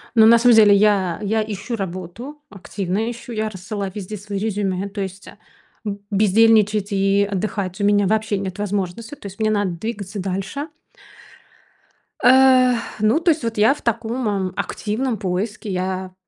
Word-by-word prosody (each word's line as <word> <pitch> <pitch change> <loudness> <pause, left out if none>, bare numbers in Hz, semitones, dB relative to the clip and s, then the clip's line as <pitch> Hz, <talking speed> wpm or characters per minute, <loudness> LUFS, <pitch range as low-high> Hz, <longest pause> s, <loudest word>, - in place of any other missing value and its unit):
Ну, 220 -1 +7
на 235 0 +7
самом 235 0 +5
деле 210 -2 +7
я, 200 -3 +2
я 215 +1 0
ищу 215 +3 -5
работу, 195 - -7
активно 195 +2 -3
ищу, 240 +1 -8
я 215 -1 -2
рассылаю 195 0 -5
везде 210 +1 -6
свои 200 0 -6
резюме, 200 -2 -2
то 200 0 -6
есть, 190 0 -7
а, - - -13 0.5
б 200 -1 -3
бездельничать 210 0 +3
и 195 +1 +2
отдыхать 195 -1 -3
у - - 0
меня 205 0 +3
вообще 215 0 0
нет 190 0 -5
возможности. 205 +5 -3
То - - -18
есть 200 +2 -9
мне 215 0 +1
надо 205 -3 0
двигаться 200 +2 -5
дальше. 195 - -4 1.5
Эх, 255 -2 +5 0.2
ну 215 +8 +3
то 335 0 +3
есть 310 -5 -2
вот 230 -2 -3
я 220 +6 +5
в - - -13
таком, 230 +1 -2 0.2
м, - - -15
активном 225 +2 -2
поиске. 200 +2 -3
Я 185 0 -3
205 Hz, 165 wpm, -21 LUFS, 195-225 Hz, 1.5 s, Ну